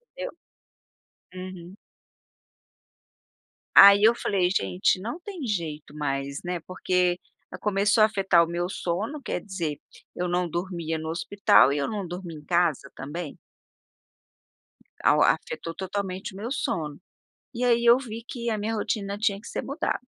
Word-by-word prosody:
Deu. -, -, -4 dB, 1.0 s
Uhum. 185 Hz, -1 st, -8 dB, 2.0 s
Aí 200 Hz, +1 st, +10 dB
eu 225 Hz, -, +7 dB
falei: 190 Hz, -6 st, 0 dB
"Gente, 95 Hz, -, +1 dB
não 235 Hz, -, -5 dB
tem 360 Hz, -5 st, -7 dB
jeito 160 Hz, -9 st, -4 dB
mais", 140 Hz, -1 st, -2 dB
né, 175 Hz, 0 st, -3 dB
porque, 180 Hz, -1 st, +1 dB, 0.3 s
ah, 180 Hz, -, -7 dB
começou 205 Hz, +3 st, +2 dB
a -, -, +9 dB
afetar 195 Hz, -5 st, +3 dB
o -, -, -2 dB
meu 175 Hz, +1 st, -2 dB
sono, 205 Hz, -, -3 dB
quer -, -, -2 dB
dizer, 170 Hz, -8 st, -4 dB, 0.4 s
eu 180 Hz, -, -2 dB
não 175 Hz, 0 st, 0 dB
dormia 170 Hz, -2 st, -3 dB
no 160 Hz, 0 st, -5 dB
hospital 180 Hz, -2 st, +4 dB
e 145 Hz, -, 0 dB
eu 140 Hz, -, 0 dB
não 205 Hz, -4 st, -3 dB
dormi 175 Hz, -1 st, -7 dB
em 150 Hz, -, -11 dB
casa 165 Hz, -5 st, +1 dB
também. 150 Hz, +3 st, -6 dB, 1.7 s
Ao -, -, +5 dB
afetou 165 Hz, -, 0 dB
totalmente 190 Hz, 0 st, -4 dB
o -, -, -10 dB
meu 225 Hz, +5 st, -5 dB
sono, 150 Hz, -, -2 dB, 0.5 s
e 245 Hz, +1 st, -3 dB
aí 235 Hz, -1 st, +3 dB
eu 235 Hz, +1 st, +8 dB
vi 230 Hz, -3 st, -7 dB
que 235 Hz, -2 st, -4 dB
a 220 Hz, -, 0 dB
minha 215 Hz, +2 st, -2 dB
rotina 205 Hz, -2 st, -2 dB
tinha 205 Hz, -2 st, 0 dB
que 210 Hz, -, -12 dB
ser -, -, -3 dB
mudada. 280 Hz, +4 st, -2 dB
185 Hz, 150 wpm, -26 LUFS, 170-215 Hz, 2.0 s, Aí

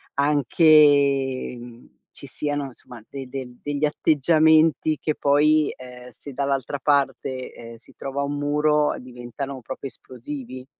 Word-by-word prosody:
anche 140 Hz, -2 st, +3 dB
mhmm, 120 Hz, 0 st, -14 dB
ci 140 Hz, -, -11 dB
siano 145 Hz, +1 st, -3 dB
somma 120 Hz, -1 st, -13 dB
de 135 Hz, -2 st, -7 dB
de 130 Hz, -2 st, -7 dB
degli 145 Hz, +1 st, -1 dB
atteggiamenti 155 Hz, +1 st, +3 dB
che 155 Hz, -, -2 dB
poi, 150 Hz, +1 st, +3 dB
ehm, 125 Hz, -1 st, -12 dB
se 140 Hz, +1 st, -11 dB
dall'altra 140 Hz, 0 st, -2 dB
parte, 135 Hz, -2 st, -1 dB
ehm, 115 Hz, 0 st, -11 dB
si 115 Hz, -, -21 dB
trova 140 Hz, +1 st, -4 dB
un 145 Hz, +1 st, -3 dB
muro, 150 Hz, +1 st, +1 dB
diventano 125 Hz, +2 st, -7 dB
proprio 130 Hz, +3 st, -7 dB
esplosivi. 130 Hz, 0 st, -9 dB
140 Hz, 130 wpm, -23 LUFS, 130-150 Hz, -, anche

